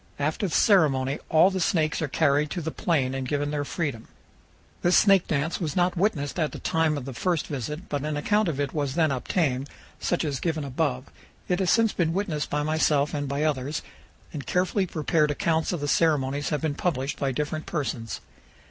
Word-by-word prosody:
After 155 Hz, +7 st, -1 dB
the 165 Hz, -, -2 dB
ceremony 140 Hz, -9 st, +3 dB
all 160 Hz, +4 st, +6 dB
of -, -, -7 dB
the 190 Hz, -, -1 dB
snakes 160 Hz, -3 st, +1 dB
are 155 Hz, -, 0 dB
carried 145 Hz, 0 st, +2 dB
to 175 Hz, -, -3 dB
the 160 Hz, -, -2 dB
plain 135 Hz, -8 st, 0 dB
and 135 Hz, -1 st, -3 dB
given 145 Hz, +1 st, -1 dB
their 145 Hz, -1 st, -1 dB
freedom. 140 Hz, -7 st, -3 dB, 0.7 s
This 175 Hz, +1 st, +4 dB
snake 195 Hz, -3 st, +5 dB
dance 155 Hz, +5 st, -1 dB
was 155 Hz, -4 st, -2 dB
not 180 Hz, 0 st, +2 dB
witnessed 175 Hz, -5 st, 0 dB
at 155 Hz, -2 st, 0 dB
the -, -, -5 dB
time 160 Hz, -3 st, +1 dB
of 135 Hz, -, -5 dB
the 135 Hz, -, -6 dB
first 170 Hz, +4 st, 0 dB
visit, 150 Hz, -, -5 dB
but 145 Hz, -1 st, -3 dB
an 150 Hz, -1 st, -2 dB
account 210 Hz, +7 st, +2 dB
of 150 Hz, -4 st, -2 dB
it 140 Hz, -1 st, -1 dB
was 145 Hz, -3 st, -2 dB
then 160 Hz, -3 st, +3 dB
obtained, 135 Hz, 0 st, -1 dB, 0.3 s
such 175 Hz, -2 st, 0 dB
as 140 Hz, -3 st, -2 dB
given 160 Hz, -3 st, -1 dB
above. 135 Hz, -1 st, -1 dB, 0.4 s
It 180 Hz, 0 st, +1 dB
has 190 Hz, -2 st, +1 dB
since 225 Hz, -2 st, +3 dB
been 165 Hz, -2 st, 0 dB
witnessed 175 Hz, -6 st, -2 dB
by 150 Hz, 0 st, 0 dB
myself 150 Hz, -2 st, +2 dB
and 145 Hz, -2 st, -2 dB
by 140 Hz, +2 st, -1 dB
others, 145 Hz, -1 st, -1 dB, 0.5 s
and 145 Hz, -3 st, -6 dB
carefully 185 Hz, +2 st, +1 dB
prepared 155 Hz, -1 st, +1 dB
accounts 160 Hz, +2 st, 0 dB
of 175 Hz, -5 st, -3 dB
the 145 Hz, -, -2 dB
ceremonies 145 Hz, -3 st, +1 dB
have 150 Hz, -, -1 dB
been 155 Hz, -2 st, 0 dB
published 145 Hz, -4 st, -2 dB
by 135 Hz, -1 st, 0 dB
different 150 Hz, +3 st, -3 dB
persons. 125 Hz, -8 st, -3 dB
150 Hz, 205 wpm, -26 LUFS, 140-170 Hz, 0.7 s, all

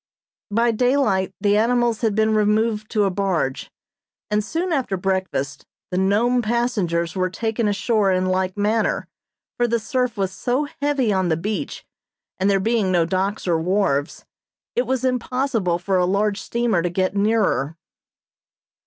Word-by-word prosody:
By 230 Hz, +3 st, +2 dB
daylight 245 Hz, -5 st, +1 dB
the 205 Hz, -1 st, +2 dB
animals 235 Hz, 0 st, +2 dB
had 220 Hz, -4 st, +1 dB
been 220 Hz, 0 st, +2 dB
removed 215 Hz, 0 st, +1 dB
to 215 Hz, -2 st, +1 dB
a 195 Hz, -, +1 dB
barge, 180 Hz, -8 st, -1 dB, 0.6 s
and 210 Hz, 0 st, +2 dB
soon 335 Hz, -, -2 dB
after 255 Hz, -9 st, -1 dB
breakfast 185 Hz, -7 st, -2 dB, 0.3 s
the 180 Hz, -, -1 dB
Nome 225 Hz, +6 st, +2 dB
passengers 210 Hz, -8 st, 0 dB
were 185 Hz, -1 st, 0 dB
taken 225 Hz, +3 st, -1 dB
ashore 205 Hz, 0 st, +1 dB
in 185 Hz, 0 st, +1 dB
like 185 Hz, +1 st, -1 dB
manner, 215 Hz, +2 st, 0 dB, 0.5 s
for 240 Hz, -, +2 dB
the 235 Hz, 0 st, +1 dB
surf 245 Hz, +1 st, -1 dB
was 190 Hz, -2 st, -1 dB
so 250 Hz, +9 st, -1 dB, 0.2 s
heavy 280 Hz, -7 st, +1 dB
on 185 Hz, -2 st, +1 dB
the 160 Hz, -, +1 dB
beach, 210 Hz, +5 st, -4 dB, 0.5 s
and 190 Hz, +2 st, +2 dB
there 195 Hz, -1 st, +3 dB
being 215 Hz, -1 st, +1 dB
no 175 Hz, -2 st, +3 dB
docks 190 Hz, +4 st, -2 dB
or 165 Hz, -2 st, +2 dB
wharves, 165 Hz, -5 st, 0 dB, 0.5 s
it 245 Hz, 0 st, +1 dB
was 260 Hz, 0 st, 0 dB
impossible 250 Hz, -7 st, 0 dB
for 185 Hz, +2 st, 0 dB
a 180 Hz, -, +3 dB
large 200 Hz, +1 st, 0 dB
steamer 235 Hz, -6 st, 0 dB
to 175 Hz, -, -1 dB
get 185 Hz, +2 st, -1 dB
nearer. 200 Hz, -8 st, +1 dB
205 Hz, 155 wpm, -22 LUFS, 185-235 Hz, 0.6 s, there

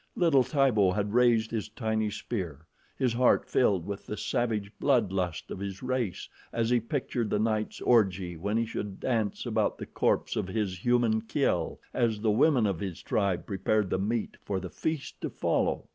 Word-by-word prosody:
Little 160 Hz, -7 st, +4 dB
Tibo 125 Hz, -, +3 dB
had 105 Hz, 0 st, -1 dB
raised 120 Hz, -2 st, +4 dB
his 110 Hz, -2 st, -3 dB
tiny 110 Hz, -1 st, -1 dB
spear, 95 Hz, -, -5 dB, 0.3 s
his 125 Hz, -3 st, +1 dB
heart 125 Hz, +1 st, +3 dB
filled 100 Hz, -9 st, +2 dB
with 100 Hz, 0 st, -6 dB
the 105 Hz, -, -4 dB
savage 110 Hz, -4 st, -1 dB
blood 120 Hz, -9 st, +3 dB
lust 90 Hz, -4 st, -2 dB
of -, -, -5 dB
his 100 Hz, +2 st, -5 dB
race, 125 Hz, -7 st, -2 dB, 0.2 s
as 115 Hz, 0 st, 0 dB
he 120 Hz, -, +4 dB
pictured 115 Hz, -1 st, -2 dB
the -, -, +1 dB
night's 110 Hz, 0 st, -1 dB
orgy 95 Hz, -7 st, +2 dB
when 100 Hz, +7 st, -1 dB
he 115 Hz, -, +1 dB
should 105 Hz, -3 st, -5 dB
dance 110 Hz, -5 st, -1 dB
about -, -, 0 dB
the -, -, -6 dB
corpse -, -, 0 dB
of -, -, -1 dB
his 95 Hz, -3 st, -2 dB
human 120 Hz, -3 st, +3 dB
kill 110 Hz, -, 0 dB
as 115 Hz, -4 st, +1 dB
the 110 Hz, 0 st, +2 dB
women 130 Hz, +1 st, +4 dB
of 95 Hz, -5 st, 0 dB
his 95 Hz, -4 st, -5 dB
tribe 100 Hz, -4 st, 0 dB
prepared 100 Hz, 0 st, 0 dB
the -, -, +1 dB
meat 110 Hz, +3 st, -2 dB
for 95 Hz, -2 st, -2 dB
the 95 Hz, -2 st, -7 dB
feast 155 Hz, -, -4 dB
to -, -, -2 dB
follow. -, -, 0 dB
110 Hz, 185 wpm, -29 LUFS, 100-120 Hz, 0.3 s, Little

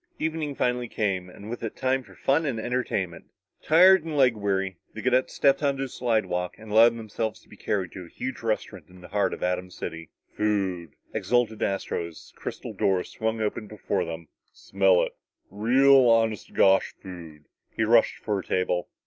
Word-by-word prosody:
Evening 155 Hz, -3 st, -2 dB
finally 125 Hz, -1 st, 0 dB
came 95 Hz, -5 st, -2 dB
and 100 Hz, +3 st, -12 dB
with 120 Hz, +2 st, -6 dB
it 115 Hz, -, -5 dB
time 130 Hz, 0 st, 0 dB
for -, -, -17 dB
fun 145 Hz, +4 st, +1 dB
and 130 Hz, -7 st, -2 dB
entertainment. 110 Hz, -8 st, -2 dB, 0.4 s
Tired 185 Hz, +2 st, +6 dB
and 160 Hz, -2 st, -4 dB
leg 130 Hz, -4 st, +4 dB
weary, 95 Hz, -3 st, -1 dB, 0.2 s
the 110 Hz, -, -5 dB
cadets 125 Hz, 0 st, +1 dB
stepped 140 Hz, 0 st, +3 dB
on 140 Hz, -2 st, 0 dB
a 135 Hz, -, -1 dB
slidewalk 110 Hz, -8 st, -1 dB
and 110 Hz, -1 st, -11 dB
allowed 115 Hz, +2 st, +6 dB
themselves 110 Hz, 0 st, -4 dB
to -, -, -25 dB
be -, -, -14 dB
carried 95 Hz, -4 st, -2 dB
to 95 Hz, -2 st, -8 dB
a -, -, -15 dB
huge 130 Hz, +8 st, -6 dB
restaurant 110 Hz, -2 st, -3 dB
in 90 Hz, 0 st, -16 dB
the 90 Hz, -, -12 dB
heart 100 Hz, -2 st, +1 dB
of -, -, -6 dB
Atom 90 Hz, 0 st, -1 dB
City. 80 Hz, -2 st, -7 dB, 0.3 s
"Food," 95 Hz, -6 st, -1 dB, 0.2 s
exulted 120 Hz, -3 st, 0 dB
Astro 95 Hz, -3 st, -1 dB
as 85 Hz, -, -14 dB
the -, -, -25 dB
crystal -, -, -6 dB
doors 95 Hz, -2 st, 0 dB
swung 110 Hz, 0 st, -2 dB
open 105 Hz, 0 st, -2 dB
before 105 Hz, -3 st, -2 dB
them. 85 Hz, -1 st, -7 dB, 0.2 s
"Smell 95 Hz, -2 st, +2 dB
it! -, -, -3 dB, 0.4 s
Real, 130 Hz, +5 st, +5 dB
honest 115 Hz, -2 st, +2 dB
to -, -, -21 dB
gosh 95 Hz, 0 st, +3 dB
food!" 85 Hz, -5 st, -10 dB, 0.2 s
He 110 Hz, -, -2 dB
rushed 115 Hz, +1 st, +4 dB
for 105 Hz, -3 st, -1 dB
a -, -, -6 dB
table. 90 Hz, -1 st, -1 dB
110 Hz, 190 wpm, -26 LUFS, 95-125 Hz, 0.4 s, Tired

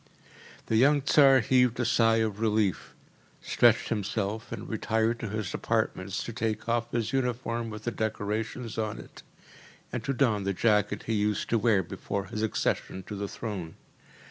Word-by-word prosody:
The 110 Hz, -, +1 dB
young 140 Hz, +3 st, +4 dB
Tsar 135 Hz, -2 st, +6 dB
heaved 125 Hz, 0 st, +3 dB
a 120 Hz, -, +1 dB
sigh 115 Hz, -1 st, +3 dB
of 105 Hz, -1 st, -4 dB
relief, 105 Hz, -3 st, 0 dB, 0.4 s
stretched -, -, +3 dB
himself 105 Hz, 0 st, -2 dB
and -, -, -6 dB
retired 110 Hz, +2 st, 0 dB
to 115 Hz, -, -4 dB
his 110 Hz, -2 st, -3 dB
apartments 95 Hz, +2 st, -1 dB
to 115 Hz, -, -6 dB
take 110 Hz, -1 st, -2 dB
off 120 Hz, 0 st, 0 dB
his 115 Hz, 0 st, -1 dB
uniform 120 Hz, -3 st, -1 dB
with 105 Hz, 0 st, -8 dB
the 120 Hz, -, -1 dB
decorations 110 Hz, +2 st, -3 dB
on 110 Hz, -1 st, -2 dB
it, -, -, -12 dB, 0.7 s
and -, -, -3 dB
to -, -, -1 dB
don 120 Hz, -6 st, +1 dB
the 100 Hz, 0 st, -1 dB
jacket 105 Hz, +1 st, +1 dB
he 115 Hz, -, -2 dB
used 105 Hz, -1 st, 0 dB
to 115 Hz, -, +3 dB
wear 105 Hz, -3 st, +3 dB
before 100 Hz, +3 st, -4 dB
his 105 Hz, +2 st, -5 dB
accession 100 Hz, -3 st, -1 dB
to 105 Hz, -, -7 dB
the 100 Hz, 0 st, -3 dB
throne. 95 Hz, -7 st, -6 dB
110 Hz, 170 wpm, -28 LUFS, 105-120 Hz, 0.7 s, Tsar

